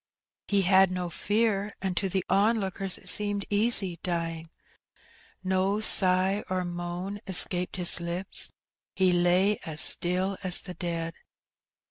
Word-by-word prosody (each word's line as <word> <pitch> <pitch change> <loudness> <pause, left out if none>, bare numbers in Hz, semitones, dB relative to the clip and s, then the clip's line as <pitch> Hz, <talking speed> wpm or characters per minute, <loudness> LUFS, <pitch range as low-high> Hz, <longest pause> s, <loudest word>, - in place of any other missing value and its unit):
He 200 -1 +1
had 190 +1 +4
no 180 -1 -5
fear, 210 -1 -1
and 190 -2 -4
to 195 +1 -1
the 185 0 -2
onlookers 195 -2 +1
it - - -11
seemed 205 +1 +3
easy 205 -5 +3
dying. 165 -2 -4 0.9
No 190 +2 -1
sigh 190 -1 +2
or 185 -1 -2
moan 175 +3 -6
escaped 180 -1 0
his 180 -1 +4
lips; 175 +3 -3 0.5
he 185 -1 +2
lay 180 +4 +1
as 155 -1 -5
still 185 +4 +2
as 185 -3 +1
the 180 - -9
dead. 170 -2 -5
185 Hz, 130 wpm, -26 LUFS, 175-195 Hz, 0.9 s, had